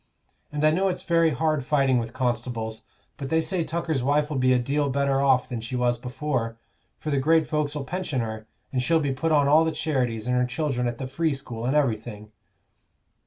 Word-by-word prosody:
And 150 +1 0
I 155 - +6
know 190 +5 +2
it's 180 - -2
very 165 -1 +3
hard 155 -2 0
fighting 135 -3 +2
with 115 -1 -4
constables; 120 -3 -2 0.3
but 135 -2 -5
they 160 - +3
say 170 +2 0
Tucker's 160 -4 -2
wife'll 145 +3 +1
be 130 0 +3
a 125 - +5
deal 140 +4 0
better 140 0 +1
off 135 -2 +3
than 120 -3 -4
she 115 +3 -5
was 120 -1 +1
before, 125 -2 -3 0.4
for 155 - -4
the 140 - +2
great 160 +3 +3
folks'll 150 -1 -2
pension 175 -3 -3
her, 110 -1 -5 0.3
and 130 - +1
she'll 165 +5 +3
be 140 -3 0
put 160 +5 -1
on 145 -2 +4
all 155 +3 +6
the 160 - 0
charities, 130 -9 -1
and 125 0 +1
her 125 0 +3
children 125 -1 -1
at 120 -1 -3
the 135 - -4
Free 155 +3 0
School, 120 -3 -5
and 135 - +1
everything. 110 -6 -1
135 Hz, 210 wpm, -25 LUFS, 125-155 Hz, 0.4 s, I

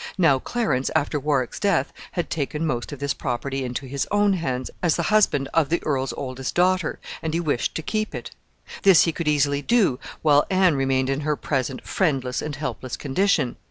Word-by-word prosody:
Now 160 -8 +4
Clarence, 175 - -1
after 150 -1 +1
Warwick's 135 -3 -1
death, 200 -1 +1 0.2
had 175 - -3
taken 150 +1 -2
most 120 -4 -2
of 145 - -6
this 140 0 -1
property 135 +1 -3
into 125 +2 -4
his 135 +1 -3
own 205 -1 +3
hands 130 -8 -2
as 175 -3 +2
the - - -1
husband 145 -10 +3
of 160 -4 +2
the 170 - +1
earl's 135 -3 0
oldest 130 -1 -5
daughter, 185 -1 +2 0.2
and 160 0 -2
he - - +1
wished 150 -7 -1
to 160 - -3
keep 215 +6 -2
it. - - -6 0.5
This 195 -4 +7
he 165 - +1
could 165 0 -4
easily 145 -1 +2
do 185 - +2 0.2
while 145 -2 +4
Anne 185 -3 +4
remained 135 -1 +1
in 135 - -1
her 150 0 0
present 135 -3 -2
friendless 135 -9 0
and 150 -1 -4
helpless 130 -3 -4
condition. 145 -2 +1
145 Hz, 195 wpm, -24 LUFS, 135-170 Hz, 0.5 s, This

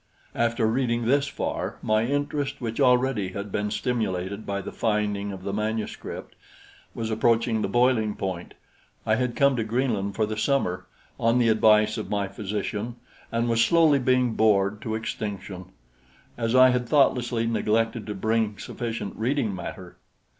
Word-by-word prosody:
After 115 0 +1
reading 120 0 0
this 140 +4 +2
far, - - -3
my 110 +1 +2
interest, 145 0 -2
which 115 -2 -4
already 125 -6 +2
had 100 0 -5
been 105 +1 -1
stimulated 100 -4 -2
by 100 0 -2
the - - -6
finding 105 -2 -1
of 95 -1 -8
the 100 - -3
manuscript, 110 +1 -4 0.6
was 115 -1 -3
approaching 115 0 +2
the - - 0
boiling 120 -4 +2
point. 95 -3 -5 0.5
I 110 - +2
had 125 +1 0
come 140 -1 +4
to 115 - 0
Greenland 110 -4 -1
for 110 - +1
the 110 0 -4
summer, 90 -9 0 0.3
on 115 0 +3
the 120 -2 +3
advice 110 0 +4
of 110 - -6
my 100 -1 -1
physician, 105 +3 -4 0.4
and 115 +1 0
was 115 0 +3
slowly 155 +1 +4
being 125 -2 +2
bored 105 -2 +2
to 110 -1 -3
extinction, 100 -4 -5 0.7
as 115 0 -1
I 130 0 +8
had 125 -1 0
thoughtlessly 120 -5 +2
neglected 115 0 0
to 105 - -4
bring 110 +1 0
sufficient 115 -1 -5
reading 120 -2 0
matter. 90 0 -8
110 Hz, 155 wpm, -25 LUFS, 105-120 Hz, 0.7 s, I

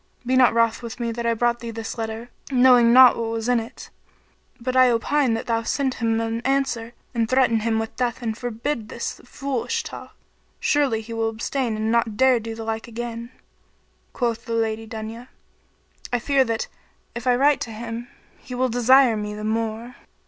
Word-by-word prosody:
Be 255 +1 +1
not 255 -1 +6
wroth 230 0 +2
with 235 +1 -7
me 235 -1 -1
that 235 0 -3
I 230 - +2
brought 240 +1 +1
thee 235 - -6
this 225 0 -5
letter, 225 +1 -5 0.2
knowing 250 -2 +6
not 255 0 +8
what 230 -1 -2
was 225 0 -3
in 245 -1 +3
it; 225 +1 -9 0.7
but 255 +2 -3
I 255 -1 +6
opine 245 +1 +1
that 225 - -4
thou 230 -1 0
send 265 +3 -1
him 225 -2 0
an 230 0 -2
answer 260 -3 -1 0.2
and 230 -2 0
threaten 255 -3 +3
him 220 0 0
with 225 0 -3
death 245 -1 -1
and 220 -2 -2
forbid 245 +4 -3
him 215 - -11
this 235 - -5
foolish 265 0 -3
talk; - - -9 0.4
surely 275 -7 +1
he 225 +1 -8
will 225 0 0
abstain 230 +1 -2
and 220 +1 -1
not 230 -2 +1
do 260 -2 +4
the 225 0 -6
like 225 +1 -4
again." 235 0 -6 0.8
Quoth 235 -2 -2
the 230 - -4
Lady 225 -1 -1
Dunya, 225 +2 -7 0.8
"I 245 - +2
fear 270 +3 +2
that, 225 -1 -2 0.5
if 240 +1 -6
I 250 - +5
write 280 +2 +3
to 230 - -4
him, 230 +2 -6 0.3
he 250 - -8
will 255 +1 +1
desire 245 +1 +5
me 210 0 -4
the 210 - -7
more." 225 +2 -3
235 Hz, 190 wpm, -23 LUFS, 225-250 Hz, 0.8 s, not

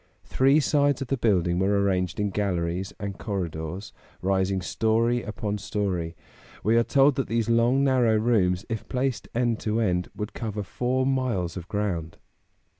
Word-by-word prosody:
Three 135 +3 +3
sides 145 -2 +2
of 125 - -11
the 135 - +2
building 90 -7 +2
were 100 +1 +2
arranged 90 -3 0
in 105 -1 0
galleries 90 -2 -1
and 100 -1 -5
corridors, 90 -2 -4 0.3
rising 95 0 +1
story 115 +5 +1
upon 105 -1 -4
story; 90 -5 -2 0.5
we 110 +3 +3
are 115 - +5
told 140 +3 +4
that 135 - 0
these 115 0 0
long 120 +4 +3
narrow 125 -5 +3
rooms, 105 -4 +2
if 115 -2 -5
placed 130 0 -1
end 120 -2 +1
to 110 +1 -1
end, 90 -5 0
would 105 +1 -5
cover 105 -3 -4
four 125 +6 -1
miles 125 -11 0
of 90 -2 -7
ground. 90 -6 -3
105 Hz, 160 wpm, -26 LUFS, 95-120 Hz, 0.5 s, are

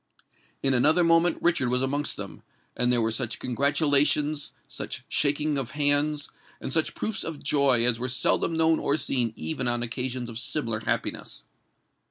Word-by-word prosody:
In 135 -1 +2
another 155 +8 +3
moment 165 0 +3
Richard 165 -8 +2
was 125 +1 +1
amongst 145 +2 -1
them; - - -7 0.3
and 125 0 +1
there 120 -2 +2
were 110 - 0
such 115 0 -2
congratulations—such 145 +3 0
shaking 150 0 0
of 130 -4 -5
hands—and 145 -1 0
such 160 -1 0
proofs 220 - -2
of 160 -3 -7
joy 135 -5 +2
as 120 -1 +4
were 125 +1 -3
seldom 130 +6 +1
known 160 0 +2
or 145 - 0
seen 125 -4 0
even 80 +11 -3
on 120 0 0
occasions 125 +1 -3
of 115 -1 -6
similar 120 -3 -1
happiness. 110 - -3
135 Hz, 155 wpm, -26 LUFS, 120-150 Hz, 0.3 s, as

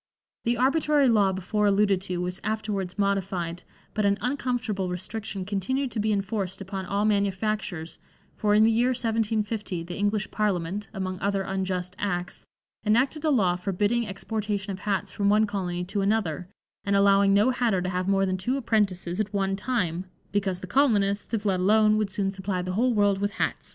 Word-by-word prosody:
The 235 +1 +1
arbitrary 285 +2 +3
law 210 -5 +4
before 200 +3 0
alluded 200 -1 +3
to 185 -2 -3
was 180 +1 -3
afterwards 210 -4 -2
modified, 190 -4 -1 0.3
but 215 - 0
an 200 0 +3
uncomfortable 245 -7 -1
restriction 190 +2 -5
continued 245 +7 -1
to 225 - -3
be 215 +1 +1
enforced 195 -2 -2
upon 190 -1 -5
all 200 +2 0
manufactures, 200 -4 -1 0.4
for 210 -1 +2
in 215 - +6
the 225 - +5
year 235 +2 +3
1750 220 -5 -1
the 175 +1 -7
English 205 0 -1
Parliament, 200 -1 -1
among 185 -1 -4
other 200 -1 0
unjust 185 -1 -3
acts, 180 -3 -3 0.4
enacted 260 +8 +2
a 315 - +2
law 195 -11 +3
forbidding 205 +5 0
exportation 205 0 -3
of 190 - -6
hats 200 -1 -1
from 200 -1 +1
one 215 +1 +4
colony 180 -4 -3
to 200 +3 -2
another 195 -5 0 0.3
and 200 0 +1
allowing 200 0 +5
no 205 +6 +4
hatter 240 -6 +1
to 185 - -1
have 180 0 -2
more 195 0 +3
than 185 0 -1
two 245 +9 -1
apprentices 200 -7 0
at 210 -2 -1
one 195 -1 0
time, 195 -6 -1 0.3
"because 195 -3 -1
the - - -5
colonists, 205 -4 +2
if 220 -2 -2
let 190 -3 +2
alone, 215 +3 +4
would 215 -2 0
soon 195 0 -1
supply 190 -1 -3
the 185 - -3
whole 240 +4 +2
world 205 -2 +3
with 205 0 -1
hats." - - -2
200 Hz, 180 wpm, -26 LUFS, 190-215 Hz, 0.4 s, in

